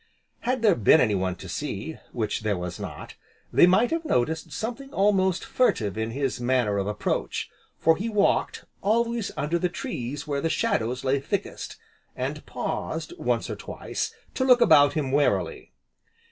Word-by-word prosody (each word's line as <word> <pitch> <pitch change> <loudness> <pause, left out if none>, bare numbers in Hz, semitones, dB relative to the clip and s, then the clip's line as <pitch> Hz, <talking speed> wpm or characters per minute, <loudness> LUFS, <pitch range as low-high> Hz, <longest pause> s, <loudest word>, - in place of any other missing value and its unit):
Had 255 -1 -1
there 215 - +6
been 120 +7 +5
anyone 95 -7 +1
to 95 - -10
see, 145 - -4
(which 110 -3 -2
there 105 -3 0
was 90 -1 -5
not), - - -7 0.4
they - - +7
might 200 - +4
have 330 0 0
noticed 160 - 0
something 245 +5 -5
almost 190 -4 +2
furtive 110 - +1
in 110 +1 -2
his 130 0 -2
manner 120 -5 +1
of 100 - -2
approach, 105 0 -2 0.3
for 160 0 +4
he 215 +6 -3
walked 210 -2 +1 0.2
always 230 +1 +1
under 160 +4 0
the 180 - +1
trees 145 - -5
where 140 -2 -2
the 165 - 0
shadows 125 - 0
lay 135 +1 +2
thickest, 200 +8 -4 0.4
and - - -3
paused, - - -4
once - - 0
or - - -4
twice, - - -4 0.2
to 260 - 0
look 250 -2 +6
about 145 -11 +6
him 145 -5 -1
warily. 145 +1 0
150 Hz, 160 wpm, -26 LUFS, -, 0.4 s, they